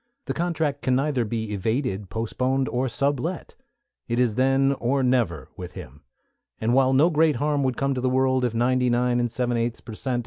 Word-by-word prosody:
The - - -2
contract 160 -4 -1
can 130 - +1
neither 135 -2 +1
be 110 -1 -3
evaded, 105 -1 -2
postponed, 130 +4 -1
nor 125 +1 0
sublet. 140 +7 -2 0.5
It 120 +1 -1
is 120 -3 +2
then 135 +3 +3
or 130 +3 +1
never 95 - 0
with 90 -1 -8
him, 70 +4 -10 0.6
and 115 +2 +1
while 130 0 +4
no 150 +6 +4
great 155 -1 +3
harm 145 +3 0
would 130 -2 0
come 140 0 0
to 125 - -3
the 130 - +1
world 130 0 +2
if 120 -2 -1
ninety 125 +1 +2
nine 120 0 +2
and 120 -1 0
seven 120 -1 -1
eighths 115 0 -2
per 115 - -10
cent. 125 +2 -2
125 Hz, 200 wpm, -24 LUFS, 120-135 Hz, 0.6 s, while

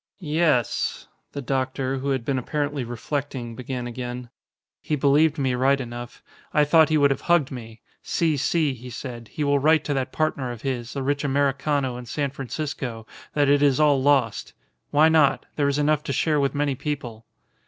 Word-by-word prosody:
"Yes," 155 - 0 0.3
the 140 - -5
doctor, 130 0 -1
who 140 +2 -3
had 130 -4 -1
been 135 -1 0
apparently 145 +1 -2
reflecting, 120 0 -4
began 125 0 -5
again, 120 0 -6 0.5
"he 155 - -1
believed 150 +3 +3
me 135 -3 0
right 135 +2 +2
enough. 120 -1 -7 0.3
I 150 - +5
thought 160 +1 +5
he 155 - +3
would 140 -1 +4
have 125 -6 -1
hugged 170 -6 +2
me. 115 -3 -9 0.2
'Si, 160 -3 0
si,' 150 +1 +1
he 125 0 -10
said, 120 -1 -7
'he 150 - -4
will 140 0 +2
write 155 +3 +4
to 145 - -1
that 135 -1 -2
partner 140 -5 -1
of 120 -2 -9
his, 125 -3 -3
the 140 - -3
rich 145 +2 0
Americano 140 -1 0
in 125 -1 -9
San 140 +3 -2
Francisco, 135 -4 -5 0.3
that 145 -1 +3
it 145 0 +4
is 140 -2 +3
all 145 -3 +4
lost. 135 -5 +1 0.4
Why 150 +2 +5
not? 160 -3 +3
There 145 -2 +1
is 140 0 +1
enough 150 0 +2
to 140 - -2
share 150 +3 +1
with 140 0 0
many 145 -1 +1
people. 125 -5 -5
140 Hz, 185 wpm, -24 LUFS, 125-145 Hz, 0.5 s, I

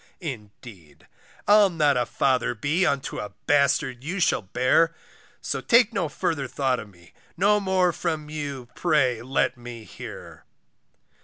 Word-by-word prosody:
Indeed 105 - -10 0.4
I'll 205 -1 +6
not 150 -5 +2
a 125 - 0
father 130 -3 +1
be 150 - +1
Unto 140 -1 -2
a 105 -1 -6
bastard 140 -3 +2
you 180 +6 -3
shall 170 - +2
bear, 130 - +2 0.5
So - - -3
take 235 -1 +4
no 160 - -1
further 145 -1 -2
thought 130 0 0
of 105 - -9
me, 85 -2 -20 0.2
No 205 +4 +4
more 190 -2 +2
from 160 -2 -3
you 145 -4 -5
pray 135 -9 +1
let 130 +1 0
me 120 -2 -9
hear. - - -10
140 Hz, 145 wpm, -25 LUFS, 120-165 Hz, 0.5 s, I'll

